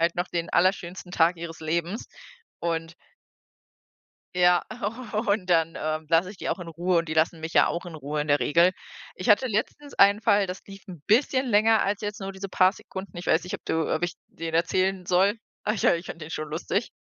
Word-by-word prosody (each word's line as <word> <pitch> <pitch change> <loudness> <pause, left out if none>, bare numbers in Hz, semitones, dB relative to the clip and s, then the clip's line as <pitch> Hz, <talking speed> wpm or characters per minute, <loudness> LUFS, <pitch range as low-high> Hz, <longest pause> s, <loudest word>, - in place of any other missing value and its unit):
halt 170 +1 +2
noch 175 +1 -1
den 170 -1 -3
allerschönsten 180 0 0
Tag 170 +2 +3
ihres 165 -1 -7
Lebens, 170 +6 -2 0.5
und 165 0 -2 1.4
ja, 180 -1 +4 0.6
und 200 -2 +1
dann 165 -1 +3
ähm, 155 0 -2
lasse 170 +3 +3
ich 210 - -12
die - - -5
auch 185 - -2
in 170 - -7
Ruhe, 170 +2 +1
und 165 -1 -2
die 155 - -2
lassen 160 +1 +1
mich 160 +1 -5
ja - - +5
auch 170 - -2
in 170 -2 -9
Ruhe 150 +1 -3
in 150 - -3
der 145 0 +4
Regel. 170 +4 +4 0.5
Ich 185 - -5
hatte 210 +5 +5
letztens 235 +7 -3
einen 200 +2 +5
Fall, 205 -2 +3
das 180 +1 -6
lief 195 -1 -11
'n 175 -6 -10
bisschen 260 +3 +3
länger 220 0 +4
als 200 +1 -1
jetzt 210 -1 -5
nur 195 0 -4
diese 190 0 -7
paar 185 0 +4
Sekunden. 190 -2 -9
Ich 175 - -7
weiß 160 - +3
nicht, 180 - -6
ob - - -7
du 160 -1 0
ob 155 - -1
ich 175 0 -3
den 165 -1 -6
erzählen 185 +3 +1
soll. 190 +4 +3 0.3
Ach 210 - +1
ja, 175 - +3
ich 170 - -8
fand 165 - -8
den 155 - -8
schon 155 -1 -4
lustig. 170 +8 -2
175 Hz, 220 wpm, -26 LUFS, 165-195 Hz, 1.4 s, ja